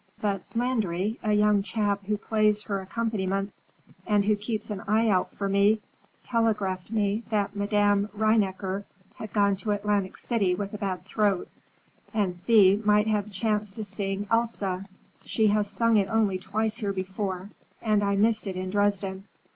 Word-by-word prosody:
But 200 -3 -1
Landry, 220 -4 0
a 215 - 0
young 210 -1 +4
chap 200 -1 -1
who 210 0 +1
plays 210 -1 +1
her 200 -2 -2
accompaniments 195 -1 -3 0.4
and 205 -2 +3
who 215 0 +3
keeps 215 +1 -4
an 200 -2 -4
eye 220 +2 +3
out 185 -3 +2
for 200 - -4
me, 200 +2 +3 0.4
telegraphed 210 -6 0
me 210 -1 0
that 210 -3 0
Madame 205 0 +2
Rheinecker 200 -3 +1 0.3
had 215 - -7
gone 200 -2 +2
to 210 - -5
Atlantic 205 -2 0
City 200 -7 0
with 200 +2 -5
a 210 - -5
bad 190 -3 -3
throat, 205 -2 0 0.7
and 180 -4 -1
Thea 200 -4 +6
might 210 0 +4
have 210 -2 0
a - - -10
chance 210 0 -1
to 220 - -5
sing 195 0 -3
Elsa. 205 -5 0 0.4
She 220 - 0
has 205 0 +1
sung 225 +2 +2
it 195 -2 +2
only 210 -4 +1
twice 215 +3 -2
here 205 -4 -2
before, 190 0 -4 0.3
and 215 -2 +1
I 200 0 +1
missed 215 +1 +2
it 190 - -3
in 185 0 -4
Dresden. 200 -1 0
205 Hz, 165 wpm, -27 LUFS, 195-215 Hz, 0.7 s, Thea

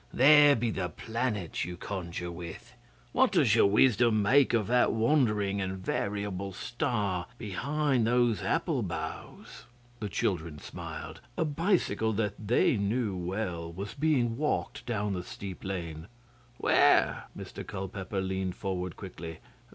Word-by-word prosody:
'There 145 +2 +7
be 115 0 0
the 90 -4 -2
planets 110 0 -2
you 90 0 -5
conjure 90 -2 -5
with! 85 -1 -9 0.4
What - - +3
does - - +4
your - - +6
wisdom 110 0 +4
make 135 +6 +5
of 115 -3 +2
that 125 +3 +3
wandering 110 -5 +2
and 95 0 -3
variable 100 0 -3
star 100 -5 -2
behind 135 +4 0
those 120 -2 +2
apple - - 0
boughs?' - - -6 0.3
The 105 - -3
children 85 -5 -1
smiled. - - -8 0.2
A 165 - +2
bicycle 155 - +1
that 105 0 0
they 120 +1 +3
knew 105 0 0
well 90 -2 -3
was 100 +4 -6
being 135 -6 +1
walked 150 -3 -2
down 105 -4 -1
the 90 - -2
steep 95 -1 -8
lane. 85 -4 -5 0.5
'Where?' - - +4
Mr - - -7
Culpeper 95 +1 -4
leaned 95 -1 -2
forward 90 -3 -3
quickly. 80 0 -8
100 Hz, 135 wpm, -29 LUFS, 95-120 Hz, 0.5 s, There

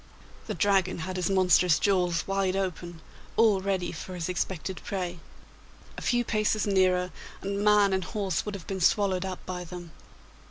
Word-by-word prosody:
The - - -3
Dragon 195 -3 +2
had 185 0 -5
his 180 -1 -1
monstrous 180 -3 +4
jaws 180 -4 +1
wide 195 -1 0
open, 175 -3 -4 0.4
all 215 -4 +4
ready 190 -2 -1
for 180 +2 -7
his 175 0 -3
expected 180 0 -3
prey. 180 -3 -4 0.8
A - - -7
few 240 0 +1
paces 215 -1 +1
nearer, 185 -2 +2 0.3
and 200 +1 -2
man 210 -2 +5
and 190 0 0
horse 195 -5 -2
would 210 -1 -5
have 185 - -9
been 190 -1 -4
swallowed 190 0 +2
up 185 -1 -6
by 180 -1 -4
them! 175 -1 -9
190 Hz, 165 wpm, -28 LUFS, 180-200 Hz, 0.8 s, man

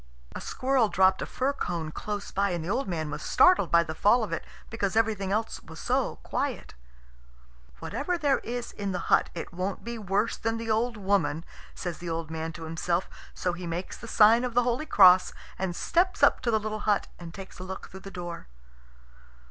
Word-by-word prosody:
A - - -5
squirrel 255 -4 +1
dropped 190 -1 +3
a - - -3
fir 270 +2 -1
cone 170 - -3
close 205 +4 -5
by, 200 +1 +1
and 170 -3 -3
the - - -4
old 265 +3 -1
man 160 -4 -3
was 150 0 -5
startled 365 0 +4
by 170 0 +5
the 160 -1 -5
fall 210 +8 +4
of 190 -6 -4
it, 165 - -3 0.3
because 205 -3 -1
everything 215 -4 +1
else 220 +2 -1
was - - -12
so - - 0
quiet. - - -3 1.0
"Whatever 350 - -2
there 290 -5 +2
is 240 +1 -5
in 200 -2 -4
the 180 - -1
hut, - - +4
it 170 - -6
won't 185 +2 -3
be 235 0 -5
worse 200 +2 0
than 225 0 -1
the 225 -1 -3
old 230 +1 0
woman," 190 -5 0 0.3
says 175 -3 -5
the 175 - -5
old 165 -1 -3
man 160 0 -3
to 165 - -9
himself. 170 +2 -1 0.3
So 180 - -1
he 175 0 -6
makes 170 +2 -4
the 235 - -10
sign 225 +2 +6
of 245 -2 -3
the 245 - +5
holy 250 +5 -1
Cross, 185 -2 +6 0.3
and 185 -2 -2
steps 370 - +1
up - - +5
to 240 - -1
the 220 -1 +3
little 215 0 -4
hut 205 - +3
and 170 -1 -8
takes 190 +1 -10
a - - -6
look 190 0 -7
through 190 - -9
the 195 - -9
door. 175 - -7
195 Hz, 210 wpm, -28 LUFS, 175-230 Hz, 1.0 s, sign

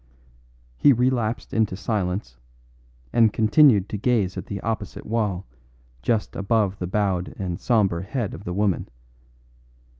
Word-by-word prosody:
He 140 - +6
relapsed 120 -2 0
into 110 -4 +1
silence, 95 - -3 0.7
and 115 -2 +5
continued 110 -2 +4
to 105 - -4
gaze 105 -5 +1
at 95 - -6
the 100 - -4
opposite 115 0 -4
wall 105 -5 -1 0.6
just 110 - -1
above 100 -1 0
the 90 - -3
bowed 95 -2 -1
and 90 -1 -4
sombre 100 -8 +2
head 110 +2 -3
of - - -9
the 90 - -4
woman. 100 -3 0
105 Hz, 130 wpm, -24 LUFS, 95-115 Hz, 0.7 s, He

